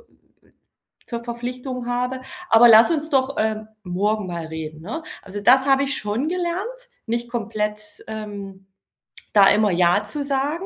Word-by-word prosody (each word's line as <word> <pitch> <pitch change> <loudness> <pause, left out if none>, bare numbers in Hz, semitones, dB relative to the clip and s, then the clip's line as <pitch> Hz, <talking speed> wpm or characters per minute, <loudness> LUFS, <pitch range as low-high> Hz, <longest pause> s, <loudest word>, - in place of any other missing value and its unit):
w 470 - -31 0.5
für 235 - -4
Verpflichtungen 245 +1 -5
habe. 250 +1 -2 0.3
„Aber 235 +1 +7
lass 225 +7 +8
uns 310 -1 -1
doch, 270 0 +1
ähm, 215 0 -1 0.2
morgen 205 +3 -1
mal 170 -2 -5
reden, 160 -1 -7
ne?“ 235 - -5 0.2
Also, 200 +1 -7
das 260 +5 +5
habe 270 0 +4
ich 275 -1 -1
schon 215 +8 -2
gelernt, 375 +8 -3 0.2
nicht 235 +1 -2
komplett, 210 -2 -4
ähm, 200 -3 -8 0.7
da 200 -2 +7
immer 210 0 +3
ja 175 +3 +3
zu 285 +7 -3
sagen. 285 +6 -1
230 Hz, 150 wpm, -22 LUFS, 205-270 Hz, 0.7 s, lass